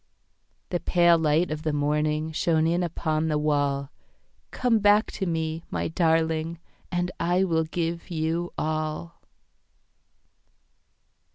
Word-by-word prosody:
The 175 - -1
pale 175 -1 +4
light 155 +2 +2
of 155 0 -3
the 155 -1 -1
morningShone 155 +2 +1
in 170 +2 +1
upon 160 -2 -1
the 155 -1 +1
wall. 145 -2 0 0.6
Come 240 -3 +1
back 205 +1 +4
to 190 - -3
me, 160 -1 -2
my - - -2
darling, 160 0 +1 0.3
And 175 0 -1
I 175 +2 +2
will 165 -3 +1
give 170 +2 -3
you 165 +1 -2
all. 155 +2 -3
160 Hz, 115 wpm, -26 LUFS, 155-175 Hz, 0.6 s, pale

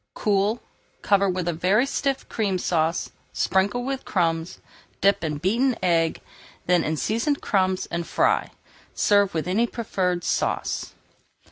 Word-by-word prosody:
Cool, 205 +2 +1 0.4
cover 200 -2 +3
with 180 -1 -2
a 175 - +1
very 190 +9 +2
stiff 275 -1 -2
Cream 200 -4 -1
Sauce, 165 -2 0 0.2
sprinkle 205 +6 +1
with 270 0 -3
crumbs, 165 -2 -1 0.4
dip 200 -1 +3
in 150 -2 -2
beaten 235 - +1
egg, 165 -2 +1 0.4
then 180 -1 +3
in 155 0 -1
seasoned 230 - 0
crumbs, 185 -2 0
and 170 -1 -3
fry. - - +1 0.5
Serve 205 -3 +3
with 160 +1 -1
any 215 +6 +2
preferred 185 -7 -2
sauce. - - -1
190 Hz, 135 wpm, -24 LUFS, 175-220 Hz, 0.5 s, cover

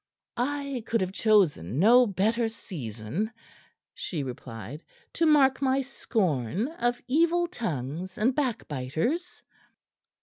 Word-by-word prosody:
"I 280 +1 -2
could 230 - +1
have 185 0 -1
chosen 180 - +2
no 240 +8 +6
better 220 +4 +1
season," 150 - -5 0.6
she 155 -6 -4
replied, 125 +2 -7 0.3
"to 330 - +2
mark 270 -3 +5
my 270 0 +2
scorn 200 - -1
of 245 -6 -2
evil 335 +6 +3
tongues 180 - -4
and 240 +5 +2
backbiters." 240 - -2
220 Hz, 105 wpm, -27 LUFS, -, 0.6 s, no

